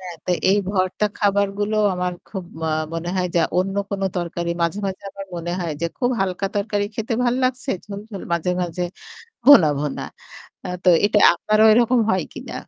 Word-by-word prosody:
হ্যাঁ, 180 -2 -8
তো - - -1 0.2
এই 200 - +4
ভর্তা 185 +1 0
খাবারগুলো 205 +1 +1 0.2
আমার 180 0 -2 0.2
খুব 190 -3 -6 0.2
ম - - -8 0.3
মনে 165 +1 -4
হয় 180 -1 +1
যা - - +5 0.2
অন্য 195 +2 -1
কোন 200 -1 -3
তরকারি 170 -1 -2
মাঝে, 170 +4 0
মাঝে 190 -1 -5
আমার 195 0 -9
মনে 170 0 -4
হয় 170 -2 -2
যে 170 - +1
খুব 245 -2 +1
হালকা 190 0 -1
তরকারি 205 0 0
খেতে 225 +2 -2
ভাল 245 0 +2
লাগছে। 255 +1 -1
ঝোল, 200 -1 -7
ঝোল 200 -3 -7
মাঝে, 170 +1 0
মাঝে 175 0 -3 0.6
ভুনা, 240 - +8
ভুনা। 145 -1 -3 0.8
তো - - +5 0.2
এটা 210 0 +3
আপনারও 215 +5 +2
ওইরকম 240 +3 +4
হয় 185 -2 +1
কিনা? - - -8
195 Hz, 180 wpm, -21 LUFS, 180-210 Hz, 0.8 s, ভুনা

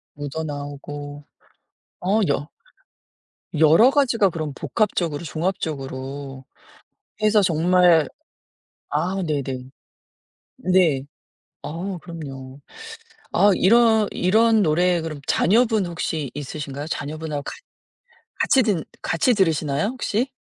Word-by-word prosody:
묻어 145 +2 -5
나오고 145 0 -7 0.8
어. 195 +5 +2
여 145 +2 -1 1.1
여러 160 - +6
가지가 245 -8 +3
그럼 155 -4 -4
복합적으로 175 - -1
종합적으로 140 -5 -4 0.8
해서 215 -1 +4
정말 175 -1 +4 0.8
아 190 +2 -1
네네. 135 -4 -3 1.0
네. 160 -8 +3 0.6
아. 180 +4 -5
그럼요. 140 -6 -9 0.7
아. 200 +3 +5
이런 220 +1 +4
이런 220 +3 +3
노래 175 +2 +2
그럼 155 -3 -6
자녀분 220 -1 +3
혹시 160 -4 -3
있으신가요? 145 0 -6
자녀분하고 150 -1 -4
같 - - -6 0.9
같이 265 - +4
듣 200 -8 0 0.2
같이 180 +9 +2
들으시나요, 160 -3 +1
혹시? 245 0 -1
165 Hz, 215 characters per minute, -22 LUFS, 145-195 Hz, 1.1 s, 여러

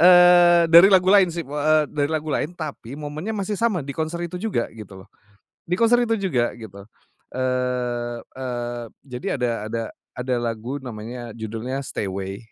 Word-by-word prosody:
Eee, 175 -1 +7
dari 170 +4 +10
lagu 190 0 +5
lain 195 -3 +6
sih 170 -1 -4
b 140 - -12
heeh, 155 +1 +3
dari 145 -1 0
lagu 155 -1 -2
lain 175 +3 -2
tapi 145 -5 -7
momennya 155 +9 -5
masih 200 +1 -2
sama 205 -8 0
di 140 - -5
konser 160 +3 -3
itu 180 +1 -6
juga 200 - -1
gitu 100 -4 -11
loh. 105 - -26 0.6
Di 175 - 0
konser 230 +3 +4
itu 225 - +1
juga 165 - 0
gitu, 100 -4 -11 0.5
eee, 125 -2 -1
eee, 120 -2 -5 0.2
jadi 125 -3 -8
ada 125 -1 +1 0.2
ada 115 +1 -3 0.3
ada 125 0 -2
lagu 120 +3 -3
namanya 120 -1 -8
judulnya 115 +4 -4
Stay 105 - -4
Away, 95 +1 -5
135 Hz, 175 wpm, -23 LUFS, 120-175 Hz, 0.6 s, dari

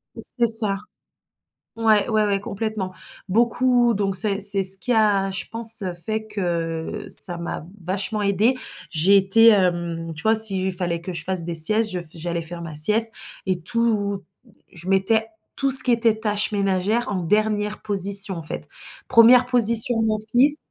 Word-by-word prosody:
C'est - - -10 0.2
c'est 235 - +3
ça. 215 -3 -3 1.0
Ouais, 220 -1 +1
ouais, 215 -1 0
ouais, 200 -1 -1
complètement. 200 -2 -6 0.4
Beaucoup 240 +3 +1
donc 195 -1 -2
c'est 200 0 0
c'est 200 0 +6
ce 190 +1 +5
qui 250 +5 -5
a, 205 -4 +1
je 190 - -5
pense, 225 -1 +4
heu, 185 -2 -5
fait 215 +6 -4
que, 170 -1 -5
ça 175 -2 +4
m'a 170 -2 -7 0.2
vachement 195 +4 -4
aidée. 205 +6 0 0.3
J'ai 180 +5 +2
été, 195 +4 +3
hem, 175 -4 -1
tu 160 - -11
vois? 220 +1 +2
S'il 195 -4 +1
fallait 175 -2 -3
que 180 +1 -8
je 165 - -5
fasse 180 -1 -4
des 170 - -5
siestes, 215 +7 +1
je 180 -1 -5
f 170 - -4
j'allais 170 0 -5
faire 170 +1 -8
ma 165 -2 -9
sieste 215 +9 +5 0.3
et 185 -2 -3
tout, 205 0 -2 0.5
je 175 +2 -10
mettais 220 +4 0 0.3
tout 275 -1 -1
ce 260 0 +11
qui 250 - 0
était 230 -2 +1
tâches 210 0 -1
ménagères, 200 +3 -2
en 190 -3 -3
dernière 210 +2 -2
position, 200 -1 +1
en 165 - -7
fait. 155 - -7 0.4
1re 245 +1 +5
position, 235 -1 +3
mon 220 -1 -1 0.2
fils, 285 +5 +2
200 Hz, 175 wpm, -21 LUFS, 185-225 Hz, 1.0 s, ce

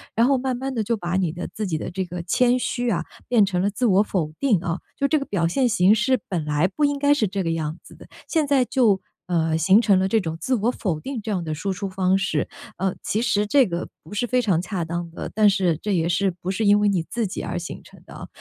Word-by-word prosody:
然 230 - +4
后 270 +1 +3
慢 255 0 -1
慢 265 +2 -4
地 225 -3 -1
就 230 +2 +1
把 180 -2 -2
你 175 -4 0
的 175 - -6
自 210 -2 -3
己 160 -3 -1
的 - - -5
这 185 +1 -2
个 175 0 -6
谦 245 +7 +2
虚 245 -1 -1
啊， 185 - 0 0.2
变 225 -5 +4
成 180 -2 -1
了 200 - +2
自 230 +5 -2
我 200 -3 +5
否 165 -7 -2
定 240 -10 +3
啊， 170 0 -2 0.2
就 280 - 0
这 305 +2 +2
个 275 - -5
表 175 -8 -1
现 250 +9 +2
形 195 -2 +4
式 255 +4 +2
本 170 -6 -2
来 150 0 -1
不 295 +10 0
应 285 0 0
该 285 0 +3
是 225 -8 +1
这 195 +1 -3
个 165 - -1
样 160 0 -3
子 - - -15
的， - - -15 0.2
现 315 -3 +1
在 275 -2 +3
就， 235 -6 +2 0.2
呃， 165 -2 +1
形 190 +7 +5
成 200 -5 +4
了 190 - +1
这 220 +1 +2
种 160 -2 -4
自 260 - -1
我 230 +3 +1
否 175 -11 -2
定 270 -3 -5
这 215 - -4
样 180 -4 -1
的 155 -1 -3
输 190 +5 -2
出 190 +2 -4
方 185 0 +1
式， 180 -6 -1 0.3
呃， 190 0 0
其 215 - -1
实 205 -3 +1
这 270 +3 +5
个 170 -2 -4
不 160 - -12
是 240 +4 -1
非 250 +1 +2
常 175 -5 +2
恰 180 -2 -3
当 170 +1 -4
的， - - -7
但 210 -1 +5
是 185 -5 +1
这 210 -2 -1
也 165 -1 +1
是 190 +3 +1
不 185 - -3
是 215 +3 -1
因 205 +1 +5
为 210 - +2
你 190 -4 +2
自 235 +6 -3
己 190 - -4
而 - - -4
形 175 0 -6
成 - - -17
的 - - -13
啊。 - - -9
195 Hz, 300 characters per minute, -23 LUFS, 175-235 Hz, 0.3 s, 我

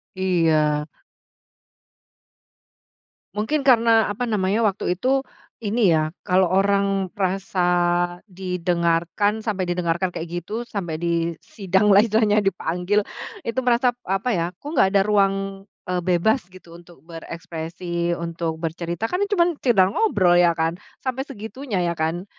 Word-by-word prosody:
Iya. 160 -5 +2 2.5
Mungkin 245 +8 -1
karena, 230 -4 +4
apa 245 +4 -2
namanya, 205 -2 0
waktu 200 -1 -1
itu, 265 +3 +1 0.4
ini 210 -4 +2
ya, 155 0 +1 0.2
kalau 185 -1 +3
orang 195 -1 +1
merasa 195 -1 -2 0.7
didengarkan, 180 +1 0
sampai 190 -5 -2
didengarkan 175 +1 0
kayak 175 0 -5
gitu, 225 +6 -5
sampai 175 -8 -4
disidang 175 +4 0
lah 200 - +7
istilahnya, 215 -1 +2
dipanggil, 195 +2 0 0.4
itu 230 +3 -3
merasa, 245 0 +2
apa 195 +6 -1
ya, 170 - 0
kok - - -16
nggak - - +4
ada 195 -1 +4
ruang, 195 -1 +1 0.2
eee, 180 0 -1
bebas 185 +8 +2
gitu 180 -2 -15
untuk 170 -4 -16
berekspresi, 170 +1 -4
untuk 170 -1 -3
bercerita, 170 +4 -4
kan 360 +10 -2
cuman 350 -3 +2
sekedar 200 -8 +4
ngobrol, 185 - +3
ya 175 -1 +5
kan? 165 +1 0 0.3
Sampai 260 0 -2
segitunya, 225 -1 -5
ya 170 - 0
kan? 165 +3 -2
190 Hz, 125 wpm, -22 LUFS, 170-210 Hz, 2.5 s, lah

